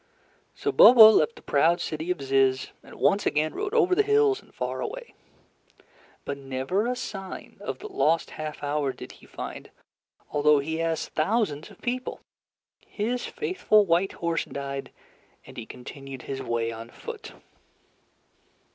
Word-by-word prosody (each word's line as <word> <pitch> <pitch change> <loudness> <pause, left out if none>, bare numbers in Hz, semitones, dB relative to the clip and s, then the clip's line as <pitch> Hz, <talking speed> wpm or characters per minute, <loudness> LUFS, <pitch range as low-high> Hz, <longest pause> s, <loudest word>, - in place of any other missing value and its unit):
So 420 +1 -1
Bobo 225 - +10
left 155 - +2
the - - -15
proud 165 +5 +3
city 160 +2 -4
of 180 -6 -2
Zizz, 135 -1 +2
and - - -14
once 205 +1 +2
again 155 +1 0
rode 415 +2 -3
over 375 -6 +4
the 365 - +4
hills 425 -1 +3
and - - -23
far - - -4
away. - - -6 1.1
But 140 0 -4
never 135 - -2
a 250 - -1
sign 195 -6 -7
of - - -4
the 425 - -8
lost 165 - +1
half 155 -1 -6
hour 145 -2 -1
did - - -10
he - - -17
find, - - -8 0.6
although 150 0 +4
he 160 +3 -2
asked 165 -1 -1
thousands 160 -3 0
of - - -17
people. 250 +1 -3 0.7
His 240 +4 -2
faithful 365 - +2
white 175 +2 +1
horse 170 -1 -1
died, 140 0 -5 0.6
and - - -13
he 115 - -7
continued 135 +1 -9
his 135 -1 -5
way 115 -2 -1
on 115 +1 -8
foot. - - -9
165 Hz, 155 wpm, -26 LUFS, -, 1.1 s, Bobo